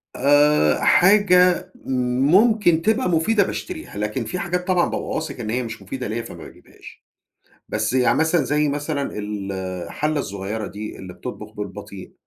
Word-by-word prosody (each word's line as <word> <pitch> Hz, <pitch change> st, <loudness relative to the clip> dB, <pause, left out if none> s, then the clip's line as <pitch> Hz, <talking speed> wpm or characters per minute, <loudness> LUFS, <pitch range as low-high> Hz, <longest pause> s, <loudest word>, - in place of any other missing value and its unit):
آآ، 145 Hz, -, +4 dB
حاجة 180 Hz, -2 st, +4 dB
ممكن 160 Hz, -, +3 dB
تبقى 220 Hz, +2 st, +1 dB
مفيدة، 200 Hz, +6 st, +3 dB
باشتريها. 320 Hz, -, -6 dB
لكن 105 Hz, +1 st, -2 dB
في 180 Hz, -, -4 dB
حاجات 180 Hz, +1 st, -2 dB
طبعًا 180 Hz, -2 st, +3 dB
بابقى -, -, -4 dB
واثق 155 Hz, -4 st, -4 dB
إن 110 Hz, -3 st, -4 dB
هي 125 Hz, +3 st, -1 dB
مش 115 Hz, -2 st, -7 dB
مفيدة 125 Hz, +6 st, -5 dB
ليَّا، 110 Hz, +3 st, -3 dB
فما -, -, -10 dB
باجيبهاش. -, -, -15 dB, 0.6 s
بس -, -, -1 dB
يعني 125 Hz, -2 st, +3 dB
مثلًا 160 Hz, +1 st, +2 dB
زي 150 Hz, 0 st, +1 dB
مثلًا 145 Hz, 0 st, -2 dB
الحلَّة 100 Hz, -, -3 dB
الصغيرة 100 Hz, -1 st, -4 dB
دي 105 Hz, +1 st, -7 dB
اللي 90 Hz, -1 st, -9 dB
بتطبُخ 105 Hz, -2 st, -8 dB
بالبطيء، 100 Hz, -2 st, -8 dB
140 Hz, 145 wpm, -22 LUFS, 105-175 Hz, 0.6 s, آآ